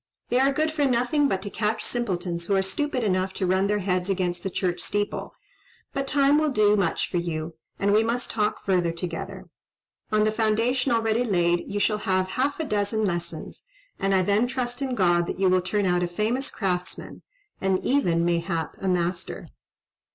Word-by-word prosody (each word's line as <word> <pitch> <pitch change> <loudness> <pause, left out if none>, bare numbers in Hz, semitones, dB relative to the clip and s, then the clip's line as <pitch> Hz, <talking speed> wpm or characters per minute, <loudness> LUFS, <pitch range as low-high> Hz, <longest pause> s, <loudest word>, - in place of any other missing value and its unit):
They 245 - +3
are 270 +1 +4
good 310 +3 0
for 305 -2 0
nothing 255 +3 +2
but 190 -7 -1
to 205 - -5
catch 215 0 -1
simpletons 175 -7 -2
who 200 - +2
are 190 - +3
stupid 255 +5 -1
enough 185 -2 0
to 190 - -1
run 190 +2 +2
their 210 +1 +1
heads 180 -1 0
against 180 -2 -1
the 195 - -3
church 180 -1 -1
steeple; 205 +3 -3 0.6
but 275 -1 -2
time 285 +1 +4
will 310 0 +2
do 210 -5 +4
much 190 -5 0
for 180 - -2
you, 165 -1 -3 0.2
and 200 0 +2
we 215 +1 +5
must 235 +2 -2
talk 210 -2 -1
further 180 -3 +2
together. 170 0 -5 0.7
On 215 0 +3
the 215 - +2
foundation 230 +4 +1
already 225 0 +2
laid 175 -5 +1
you 205 - -2
shall 210 +1 +1
have 185 -2 0
half 270 +10 -1
a - - 0
dozen 210 -2 0
lessons; 175 - -4 0.3
and 195 0 +2
I 185 - +3
then 205 +5 +2
trust 250 0 -3
in 265 -2 -1
God 175 -4 +3
that - - -4
you 195 - +3
will 185 0 +3
turn 200 +2 0
out 180 -1 +2
a 175 - +1
famous 220 +10 -1
craftsman, 180 -3 -3 0.4
and 190 -1 +2
even, 175 -12 +2
mayhap, 170 -2 -1
a 195 - -2
master." 180 0 -1
200 Hz, 195 wpm, -25 LUFS, 180-240 Hz, 0.7 s, we